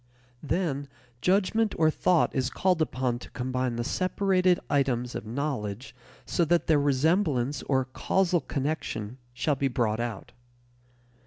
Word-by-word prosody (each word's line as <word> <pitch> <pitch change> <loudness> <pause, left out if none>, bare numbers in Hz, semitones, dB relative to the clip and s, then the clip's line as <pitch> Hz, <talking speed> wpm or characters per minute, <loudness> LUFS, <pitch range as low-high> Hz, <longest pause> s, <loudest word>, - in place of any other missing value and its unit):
Then 145 -3 -1 0.3
judgment 205 +3 +2
or 160 -1 +4
thought 175 +1 +2
is 130 -3 0
called 180 0 +1
upon 130 -5 0
to - - -11
combine 125 -1 -2
the 120 - -2
separated 185 +3 +2
items 125 -4 0
of - - -6
"knowledge" 115 -4 -4 0.3
so 175 - +1
that 170 +1 +2
their 150 -3 +3
resemblance 145 -2 +1
or 130 -2 +1
causal 175 +6 +1
connection 135 -5 -3 0.2
shall 150 +4 +1
be 135 +1 0
brought 120 -4 0
out. 120 -4 -4
140 Hz, 135 wpm, -27 LUFS, 125-170 Hz, 0.3 s, or